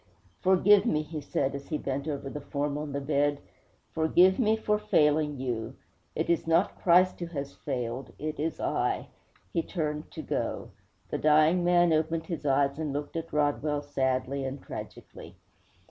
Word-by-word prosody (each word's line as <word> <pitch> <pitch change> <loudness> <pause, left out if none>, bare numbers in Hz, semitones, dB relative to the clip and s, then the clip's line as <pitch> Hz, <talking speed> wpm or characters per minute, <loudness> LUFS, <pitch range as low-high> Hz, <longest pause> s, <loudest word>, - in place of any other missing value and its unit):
'Forgive 190 +2 +5
me,' 155 -8 +1
he 155 0 -6
said, 135 -1 -1
as 140 0 -7
he 155 - -1
bent 140 +1 -3
over 140 -2 -3
the 145 +2 -6
form 145 0 -2
on 150 0 -4
the 140 - -2
bed, 145 0 +1 0.5
'forgive 175 +4 +4
me 220 -3 +3
for 210 -1 0
failing 150 -8 +2
you. 120 -4 -3 0.4
It - - -1
is 170 -1 +1
not 165 +4 +2
Christ 180 +1 +4
who 170 - -4
has 140 -4 -5
failed; 125 -2 -4
it 155 0 -4
is 160 +1 -2
I.' - - -1 0.4
He 165 - +2
turned 150 -4 -3
to - - -8
go. - - -3 0.4
The - - -1
dying 155 +3 +4
man 175 -1 +4
opened 160 +1 0
his 160 -3 -4
eyes 140 +1 +2
and 155 -2 -2
looked 145 +3 -4
at 165 0 -4
Rodwell 145 0 0
sadly 135 -1 -1
and 135 +1 -4
tragically. - - -9
150 Hz, 170 wpm, -28 LUFS, 140-165 Hz, 0.5 s, Forgive